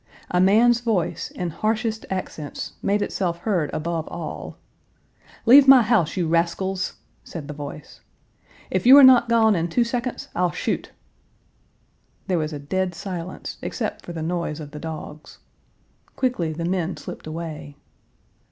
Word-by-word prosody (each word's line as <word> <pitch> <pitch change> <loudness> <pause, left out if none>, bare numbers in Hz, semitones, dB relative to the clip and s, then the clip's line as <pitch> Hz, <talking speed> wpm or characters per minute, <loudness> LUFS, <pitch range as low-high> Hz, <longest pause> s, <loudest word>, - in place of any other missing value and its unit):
A 180 - +3
man's 230 +5 +5
voice, 220 -8 -1
in 175 -2 -4
harshest 220 +4 -2
accents, 160 -6 -5
made 205 +1 +1
itself 175 -3 -2
heard 175 -9 0
above 165 0 -3
all: - - -7 0.9
"Leave 270 +3 +8
my 265 -3 +9
house, 210 -8 +1
you 175 -3 0
rascals!" 175 +3 0 0.3
said 155 -5 -8
the 150 - -6
voice. 145 0 -9 0.7
"If 185 +4 0
you 265 +2 +10
are 285 - +9
not 250 -2 +7
gone 220 -2 +4
in 170 -1 0
two 240 +8 +2
seconds, 240 +1 -4
I'll 180 0 +1
shoot!" - - -3 1.3
There 180 -3 0
was 155 0 -2
a 150 - -5
dead 180 +5 -2
silence 180 -1 -6
except - - -4
for - - -8
the 165 -2 -5
noise 170 -2 -2
of 150 -2 -8
the 150 - -8
dogs. 155 -1 -8 0.8
Quickly 245 -11 -1
the 165 +2 -4
men 175 -2 -1
slipped 150 - -9
away. 155 -2 -6
180 Hz, 150 wpm, -23 LUFS, 160-220 Hz, 1.3 s, you